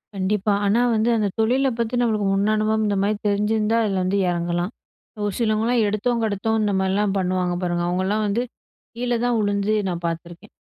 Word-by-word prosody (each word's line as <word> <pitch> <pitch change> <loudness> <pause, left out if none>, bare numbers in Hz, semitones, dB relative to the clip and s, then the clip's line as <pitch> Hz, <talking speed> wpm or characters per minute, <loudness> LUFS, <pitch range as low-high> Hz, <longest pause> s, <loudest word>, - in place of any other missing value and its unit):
கண்டிப்பா. 200 +2 0
ஆனா 210 +4 +3
வந்து 220 +2 +2
அந்த 210 -2 +1
தொழில 255 +5 +2
பத்தி 230 +1 -1
நம்மளுக்கு 215 -4 +1
முன் 200 +2 +2
அனுபவம் 215 0 +1
இந்தமாரி 200 +1 +1
தெரிஞ்சிருந்தா, 210 +2 +1
அதில 195 -2 0
வந்து 185 +2 0
இறங்கலாம். 175 +2 -1 0.5
ஒரு 205 - -1
சிலவங்கலாம் 225 +1 +1
எடுத்தோம், 230 +3 0
கெடுத்தோம் 220 +1 0
இந்தமாரிலாம் 195 0 +1
பண்ணுவாங்க 180 -1 0
பாருங்க. 175 -1 -1
அவுங்கள்லாம் 190 +4 0
வந்து 215 +4 0 0.5
கீழ 245 +1 -3
தான் 245 -2 +1
விழுந்து 205 +1 0 0.2
நான் 175 -1 -4
பார்த்துருக்கேன். 170 +4 -7
205 Hz, 160 wpm, -22 LUFS, 190-220 Hz, 0.5 s, ஆனா